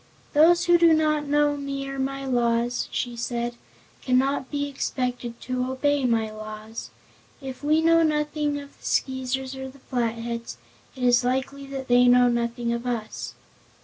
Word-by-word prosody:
"Those 340 +4 +5
who 345 0 +5
do 335 -1 +6
not 305 -2 +1
know 295 0 +3
me 275 -1 -4
or 275 0 -5
my 275 +1 -2
laws," 240 -1 +1
she 245 -1 -3
said, 235 0 -2 0.5
"cannot 260 +1 +1
be 285 -1 -2
expected 250 -3 -3
to 255 0 -2
obey 285 +1 +1
my 225 -3 +1
laws. 215 +1 -8 0.5
If 265 -1 -8
we 310 +2 +3
know 330 0 +5
nothing 300 -1 0
of 280 0 -12
the - - -23
Skeezers 260 0 -1
or 265 0 -6
the 270 - -15
Flatheads, 235 - -3 0.4
it 255 - -6
is 245 0 +4
likely 265 +2 -2
that 270 -1 -6
they 245 0 +5
know 245 0 +6
nothing 235 0 -1
of 235 +1 -4
us." 230 -3 -4
260 Hz, 160 wpm, -25 LUFS, 240-285 Hz, 0.5 s, do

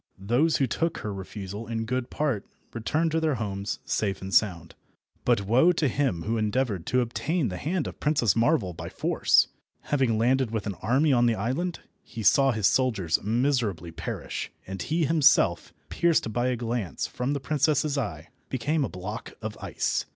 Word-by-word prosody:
Those 120 +12 +2
who 135 - +2
took 165 +6 -1
her 105 - -4
refusal 100 +2 -7
in 115 0 -2
good 125 +1 -2
part 140 -10 -1 0.3
returned 155 +8 0
to 160 - +1
their 155 -3 +1
homes 100 -3 -3
safe 100 -3 -1
and 95 0 -7
sound, 85 -6 +2 0.5
but 100 - +2
woe 125 - +5
to 160 -3 +1
him 125 -10 0
who 115 +2 -1
endeavoured 110 -4 -1
to 125 0 +2
obtain 130 +4 -1
the 90 - -5
hand 165 - -1
of - - -7
Princess 145 -9 +2
Marvel 115 - +2
by 85 +1 -7
force! - - +3 0.3
Having 130 -6 +1
landed 125 +2 +2
with 110 -2 -3
an 100 - -2
army 135 +5 +3
on 120 -1 +4
the 115 - +2
island, 135 - -2 0.2
he 115 -3 -8
saw 135 +7 +5
his 110 -4 -1
soldiers 100 -12 +2
miserably 110 - 0
perish, 80 0 -5
and 95 0 -6
he 160 +1 0
himself, 145 - +3 0.2
pierced 165 -10 +1
by 120 +2 +1
a 125 - +1
glance 115 -5 -3
from 125 +3 -2
the 140 - -1
princess's 150 +2 +1
eye, 90 - -4 0.2
became 145 +4 0
a - - -2
block 95 +4 -7
of 110 -1 -5
ice. - - -1
120 Hz, 180 wpm, -27 LUFS, 100-140 Hz, 0.5 s, woe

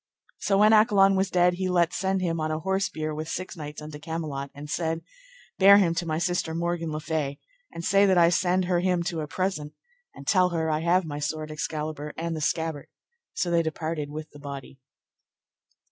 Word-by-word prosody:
So 195 - +1
when 215 +2 +6
Accolon 205 -3 +5
was 190 0 +1
dead 180 -1 +3
he 185 +1 -2
let 175 -1 +2
send 190 0 0
him 165 -2 -1
on 155 0 -1
an 155 0 -2
horse 190 +3 0
bier 155 0 -4
with 155 +1 -5
six 185 +2 -4
knights 150 -2 -7
unto 150 -1 -8
Camelot, 150 -4 -4
and 145 +1 -8
said: 165 +1 -2 0.6
Bear 200 +1 +9
him 180 -5 +3
to 170 0 -2
my 155 -1 -1
sister 175 -1 -1
Morgan 170 -1 -2
le 155 - -3
Fay, 150 -3 -2 0.3
and 170 - -6
say 200 +1 +4
that 190 -1 +4
I 170 -1 +6
send 180 +1 +2
her 175 -1 +1
him 180 -1 +1
to 170 -1 -3
a 150 - -4
present, 155 -3 -2 0.4
and - - -11
tell 185 -2 +4
her 160 -2 -1
I 155 - +1
have 175 +2 +2
my 145 -2 -5
sword 155 +1 -3
Excalibur 155 -1 -4
and 165 0 -2
the 155 - -4
scabbard; 160 -2 -1 0.5
so 175 - -1
they 170 -1 +4
departed 160 -2 -3
with 155 +1 -7
the 145 - -13
body. 140 -2 -8
165 Hz, 205 wpm, -26 LUFS, 155-180 Hz, 0.6 s, Bear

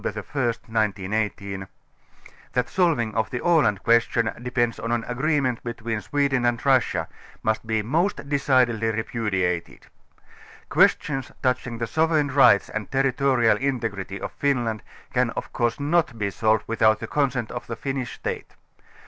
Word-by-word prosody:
1st 125 -4 -3
1918) 100 -2 -2 0.9
that 125 - +1
a - - -17
solving 155 - +1
of 110 -1 0
the 125 - -3
Aland 150 - +2
question 115 0 +3
dei>ends 120 -1 -1
on 115 - -2
an 120 -1 0
agreement 130 -1 0
between 115 -2 -4
Sweden 140 -2 0
and 120 0 0
Russia, 130 -3 +2 0.4
must 110 0 -1
be 110 -1 0
most 160 - 0
decidedly 130 -5 +2
repudiated. 105 -6 -2 0.8
Questions 135 -3 +2
touching 125 -2 0
the 115 - -2
sovereign 155 +2 +1
rights 130 -7 +5
and 110 -1 -5
territorial 135 -3 +2
integrity 110 -8 -3
of - - -5
Finland 120 -6 0 0.3
can - - +2
of - - -5
course 120 +1 0
not 145 -4 +1
be 100 -2 -1
solved 110 +1 +1
without 110 -1 +3
the - - -5
consent 130 -5 -1
of 120 - -6
the 115 - -4
Finnish. 135 +1 -4
State. - - -5
120 Hz, 140 wpm, -24 LUFS, 110-135 Hz, 0.9 s, rights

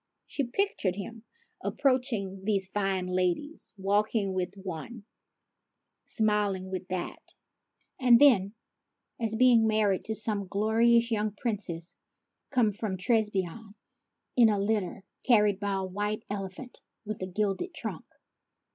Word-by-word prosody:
She 280 - -2
pictured 240 - -1
him 220 +3 -8 0.4
approaching 235 -8 0
these 195 -2 +1
fine 195 -2 -1
ladies, 185 - -2
walking 200 +1 +1
with 185 -1 -1
this 195 -1 -14
one, 195 +6 -6 1.0
rmiling 205 -4 0
with 185 -1 -4
that, 185 -2 -4 0.8
and 245 -3 +6
then 215 -8 +5 0.6
as 225 -2 -1
being 235 -2 +5
married 215 -3 +2
to 220 - -2
some 210 -3 -1
glorious 230 +4 +3
young 215 -1 0
Princess 200 -6 -3 0.5
come 245 -6 +3
from 205 -2 -4
Trebizonde 210 0 -1 0.6
in 235 -3 +6
a 210 - +2
litter 200 -2 -1 0.2
carried 210 -5 +4
by 200 -1 -1
a 190 -1 -1
white 205 +3 -3
elephant 200 +5 -6 0.2
with 215 -1 -5
a 185 - -2
gilded 205 - -1
trunk. - - -5
210 Hz, 125 wpm, -29 LUFS, 190-225 Hz, 1.0 s, and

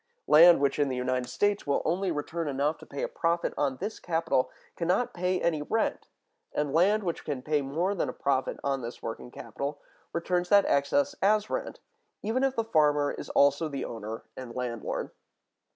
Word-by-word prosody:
Land 170 +2 +8
which 140 +1 +1
in 145 -1 +2
the 130 - -2
United 125 0 -1
States 205 +3 0
will 140 - +1
only 185 +4 0
return 160 +2 -3
enough 145 +2 0
to - - -13
pay - - -5
a - - +1
profit 170 - 0
on 135 -3 0
this 215 - -5
capital 165 -6 0 0.3
can 170 - -3
not 195 +8 +1
pay 180 +1 0
any 160 -3 0
rent. 225 +9 -1 0.5
And 150 -2 -1
land 200 +6 +4
which 170 -3 -3
can 140 -4 -4
pay 150 0 +1
more 160 +8 -1
than 200 - -1
a - - -4
profit 135 -2 0
on 135 -1 0
this 120 0 -7
working 115 +2 -5
capital, 140 +3 -5 0.3
returns 175 +1 -1
that 200 -1 +6
excess 280 - +2
as 210 +2 +2
rent, - - -4 0.4
even 230 +5 0
if 270 -1 +1
the 230 - +1
farmer 150 -8 +3
is - - -7
also 140 +3 +3
the 140 -2 -4
owner 110 -1 -6
and 125 -3 -8
landlord. 120 -3 -3
155 Hz, 190 wpm, -28 LUFS, 140-185 Hz, 0.5 s, Land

